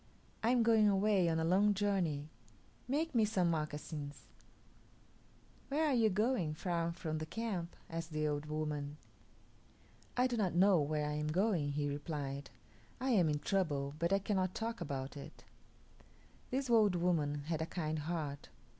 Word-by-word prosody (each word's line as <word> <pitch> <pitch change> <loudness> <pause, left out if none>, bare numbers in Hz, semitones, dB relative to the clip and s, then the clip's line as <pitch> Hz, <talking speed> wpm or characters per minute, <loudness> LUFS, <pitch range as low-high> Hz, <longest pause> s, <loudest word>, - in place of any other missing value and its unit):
I 225 - +2
am 245 -1 +4
going 220 -2 +5
away, 195 -3 +3
on 160 0 +1
a - - 0
long 200 +5 +4
journey. 175 -8 0 0.6
Make 310 +5 0
me 230 -3 +4
some 190 -5 +2
moccasins." 150 -2 -4 1.4
"Where 300 +3 +1
are 295 - +2
you 230 -3 +4
going 210 -6 +1
far 170 0 -1
from 160 -2 -4
the 155 - -3
camp?" 185 -3 -3
asked 165 0 -5
the 155 0 0
old 150 0 -2
woman. 150 -1 -3 1.2
"I 250 - +4
do 245 -2 0
not 190 -6 0
know 185 -2 +5
where 150 +1 0
I 150 - -2
am 150 0 -2
going," 170 -3 +1
he 145 0 0
replied; 145 -1 -4 0.5
"I 260 +1 0
am 180 -9 +4
in 150 -1 -1
trouble, 145 -8 0
but 170 +2 +1
I 195 - +5
cannot 190 -2 -1
talk 230 -2 -3
about 135 -3 -4
it." 140 - -10 1.1
This 265 +1 -1
old 215 -5 +4
woman 155 -5 +1
had 160 +1 -2
a 160 - -1
kind 155 -2 -2
heart. 150 -3 -4
170 Hz, 165 wpm, -35 LUFS, 150-205 Hz, 1.4 s, going